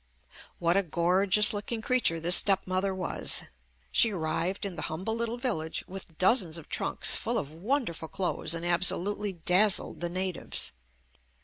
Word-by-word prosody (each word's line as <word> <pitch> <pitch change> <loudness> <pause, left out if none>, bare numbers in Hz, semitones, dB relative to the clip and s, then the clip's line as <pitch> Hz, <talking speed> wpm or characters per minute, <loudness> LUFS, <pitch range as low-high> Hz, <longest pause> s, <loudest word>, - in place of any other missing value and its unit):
What 170 0 +1
a - - +4
gorgeous 185 +5 +3
looking 220 +2 -5
creature 250 -11 0
this 175 +2 +6
step 195 -2 +4
mother 185 +1 -1
was. 185 - 0 0.5
She 225 - +3
arrived 180 +2 -3
in 195 - -3
the 160 - -7
humble 185 +8 -3
little 235 +1 -3
village 160 -11 -3
with 185 -4 -10
dozens 185 -4 +2
of 165 - -12
trunks - - +2
full - - -2
of 140 - -4
wonderful 180 - -3
clothes 175 -1 -2
and 165 +1 -4
absolutely 190 +3 +1
dazzled 185 +4 +2
the 175 - -2
natives. 185 0 -2
185 Hz, 150 wpm, -28 LUFS, 170-205 Hz, 0.5 s, this